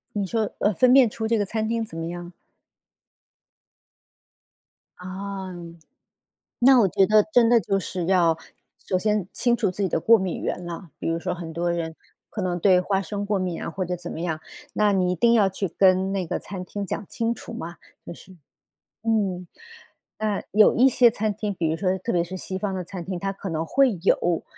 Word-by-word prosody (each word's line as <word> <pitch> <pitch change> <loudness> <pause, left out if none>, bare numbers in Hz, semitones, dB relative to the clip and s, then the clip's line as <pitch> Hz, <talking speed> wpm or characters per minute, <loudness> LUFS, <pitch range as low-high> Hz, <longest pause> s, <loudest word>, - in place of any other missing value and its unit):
你 205 -1 -1
说， 220 0 -1
呃， 210 - +2
分 250 +6 +4
辨 260 -3 +6
出 220 +1 -4
这 230 0 +2
个 205 - 0
餐 220 +2 -2
厅 230 0 -1
怎 165 - -10
么 165 0 -4
样 175 +1 -6
吗？ 175 - -13 2.6
啊。 190 +1 -6 1.1
那 255 +1 +6
我 200 - +4
觉 190 +2 +3
得 215 +1 +5
真 235 -1 +5
的 235 0 +5
就 195 -2 0
是 180 -1 -4
要 170 -3 +3 0.5
首 185 - +1
先 210 -1 0
清 240 -1 +1
楚 215 -5 0
自 195 +3 -4
己 190 - +1
的 160 - -1
过 230 +5 +6
敏 190 -3 -3
源 180 - -3
了。 170 0 -7
比 - - -3
如 165 0 0
说 180 +1 -3
很 165 -2 -7
多 170 +2 -1
人 165 -1 -4 0.3
可 215 - -5
能 180 -1 -1
对 180 0 +4
花 195 +1 0
生 205 +3 -4
过 205 -1 0
敏 180 -3 -3
啊 - - -4
或 185 +2 -3
者 180 0 -3
怎 175 0 -8
么 - - -6
样， 160 -2 -2 0.3
那 210 -1 +2
你 180 -2 +1
一 - - 0
定 235 +5 +3
要 210 -4 +4
去 190 0 -3
跟 190 +2 +3
那 190 -2 -2
个 - - -2
餐 185 -2 -7
厅 200 +2 -5
讲 190 - -4
清 230 0 -1
楚 - - -9
嘛， 175 -7 -7 0.3
就 - - -6
是 190 - -15 0.7
嗯， 200 -6 0 0.7
那 215 -2 -1
有 210 0 +5
一 260 +3 +5
些 250 -1 +5
餐 215 0 -1
厅， 210 0 -3
比 165 -4 -1
如 160 - -1
说 190 0 0
特 230 +6 -3
别 175 -1 +2
是 180 +2 -7
西 190 +1 -5
方 195 0 -3
的 185 - -3
餐 180 -1 -8
厅， 185 -1 -4
它 195 +2 -2
可 195 0 -7
能 160 -1 -2
会 260 +1 +2
有， 175 -3 +2
190 Hz, 230 characters per minute, -24 LUFS, 175-215 Hz, 2.6 s, 辨